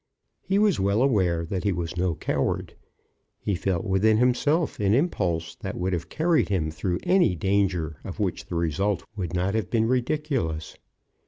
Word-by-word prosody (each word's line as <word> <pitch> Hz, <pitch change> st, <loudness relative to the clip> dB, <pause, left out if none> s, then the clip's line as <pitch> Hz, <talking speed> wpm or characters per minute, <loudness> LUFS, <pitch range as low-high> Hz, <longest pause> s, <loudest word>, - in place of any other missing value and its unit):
He 195 Hz, -, 0 dB
was 205 Hz, -3 st, +3 dB
well 100 Hz, +5 st, +2 dB
aware 90 Hz, -10 st, +2 dB
that 90 Hz, +2 st, -3 dB
he 100 Hz, -, +2 dB
was 85 Hz, -1 st, -3 dB
no 90 Hz, -2 st, 0 dB
coward. -, -, -1 dB, 0.7 s
He 100 Hz, -, -2 dB
felt 90 Hz, 0 st, -1 dB
within 105 Hz, +2 st, +3 dB
himself 140 Hz, +7 st, +1 dB
an 100 Hz, +1 st, +3 dB
impulse 90 Hz, -, 0 dB
that -, -, -5 dB
would 90 Hz, +1 st, -1 dB
have 85 Hz, -1 st, -3 dB
carried 160 Hz, -, +2 dB
him 80 Hz, -6 st, 0 dB
through 90 Hz, +3 st, -2 dB
any 180 Hz, -, +3 dB
danger 90 Hz, -5 st, 0 dB
of -, -, -7 dB
which -, -, -2 dB
the -, -, -5 dB
result 85 Hz, +5 st, 0 dB
would 90 Hz, -4 st, -4 dB
not 90 Hz, +3 st, 0 dB
have 110 Hz, -4 st, -1 dB
been 115 Hz, -1 st, +2 dB
ridiculous. 125 Hz, -, -1 dB
95 Hz, 170 wpm, -25 LUFS, 85-120 Hz, 0.7 s, was